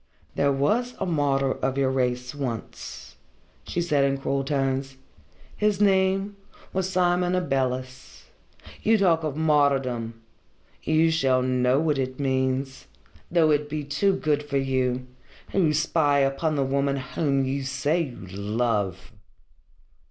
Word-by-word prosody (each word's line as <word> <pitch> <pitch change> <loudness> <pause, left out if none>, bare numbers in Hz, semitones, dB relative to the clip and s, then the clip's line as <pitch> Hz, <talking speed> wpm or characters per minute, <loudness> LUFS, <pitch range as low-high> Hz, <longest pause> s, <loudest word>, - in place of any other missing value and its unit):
"There 140 0 +2
was 220 - 0
a - - -1
martyr 140 -5 +1
of 135 +1 -1
your 135 -1 +2
race 125 -1 -1
once," 130 -6 -6 0.5
she 175 - -1
said 150 -5 +2
in 140 0 +1
cruel 135 0 -1
tones. 135 -1 -1 0.6
"His 210 -2 +1
name 195 0 +2 0.4
was 190 0 -1
Simon 180 -1 +2
Abeles. 130 -6 -3 0.6
You 220 +1 +4
talk 170 -5 +3
of 150 -3 -2
martyrdom! 135 -7 +1 0.6
You 160 +1 +3
shall 130 -5 +2
know 125 +1 +2
what 150 -3 +1
it 130 0 -3
means 130 0 -1 0.4
though 165 -3 +3
it 150 0 +1
be 150 0 -3
too 150 +8 +1
good 150 -4 0
for 145 -1 -2
you, 130 -2 0 0.5
who 175 -6 +2
spy 150 -1 +2
upon 135 +3 0
the 140 - +1
woman 140 +1 0
whom 135 0 -1
you 135 +1 -2
say 140 +5 0
you 125 - -6
love." 100 -1 -2
140 Hz, 135 wpm, -25 LUFS, 130-160 Hz, 0.6 s, You